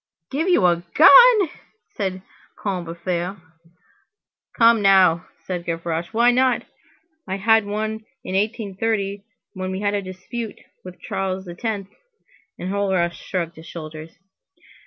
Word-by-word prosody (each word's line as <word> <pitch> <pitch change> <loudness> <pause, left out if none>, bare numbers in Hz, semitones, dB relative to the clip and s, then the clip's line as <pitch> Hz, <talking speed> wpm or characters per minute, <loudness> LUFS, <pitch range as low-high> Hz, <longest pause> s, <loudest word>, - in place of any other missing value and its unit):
"Give 320 +7 -1
you 250 - +4
a 170 -1 +3
gun!" 425 +3 +8 0.4
said 190 -2 -4 0.3
Combeferre. 180 0 -3 1.2
"Come 230 -1 +5
now!" 185 -4 +4 0.2
said 180 -2 -4
Gavroche, 165 0 -3
"why 235 +2 +4
not? 255 0 +2 0.6
I 190 - -2
had 225 +1 +3
one 215 +1 -3 0.2
in - - -6
1830 200 -1 -1 0.3
when 185 -2 -4
we 190 +1 -4
had 205 0 0
a 205 - 0
dispute 195 +4 -7 0.2
with 180 -1 -11
Charles 190 0 -3
X." 195 +2 -4 0.7
Enjolras 185 -2 0
shrugged 170 -3 -4
his 160 - -12
shoulders. 155 -1 -9
195 Hz, 115 wpm, -22 LUFS, 175-220 Hz, 1.2 s, gun